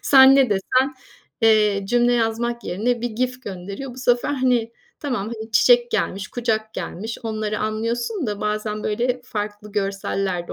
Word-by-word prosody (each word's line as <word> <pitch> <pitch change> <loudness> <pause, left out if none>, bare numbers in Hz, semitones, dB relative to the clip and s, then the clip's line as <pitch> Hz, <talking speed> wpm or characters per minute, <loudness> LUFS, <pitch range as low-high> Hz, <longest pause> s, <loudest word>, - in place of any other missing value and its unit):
Sen 270 0 +8
ne 270 -4 +4
desen, 255 +8 +1 0.5
eee, 215 -2 +4
cümle 240 +2 +3
yazmak 235 0 0
yerine 230 +7 -1
bir 240 0 -2
GIF 255 +3 -2
gönderiyor. 200 +7 -7
Bu - - -11
sefer 245 +2 +1
hani, 250 -4 +1 0.3
tamam 255 -9 -2
hani, 220 0 -8
çiçek 240 +1 +5
gelmiş, 195 0 -1
kucak 220 -2 -2
gelmiş, 220 +5 -5
onları 215 -2 -2
anlıyorsun 235 - -2
da 205 -1 -3
bazen 210 0 -2
böyle 245 +4 0
farklı 210 -2 -5
görseller 195 -3 -2
de - - -5
225 Hz, 155 wpm, -22 LUFS, 210-245 Hz, 0.5 s, Sen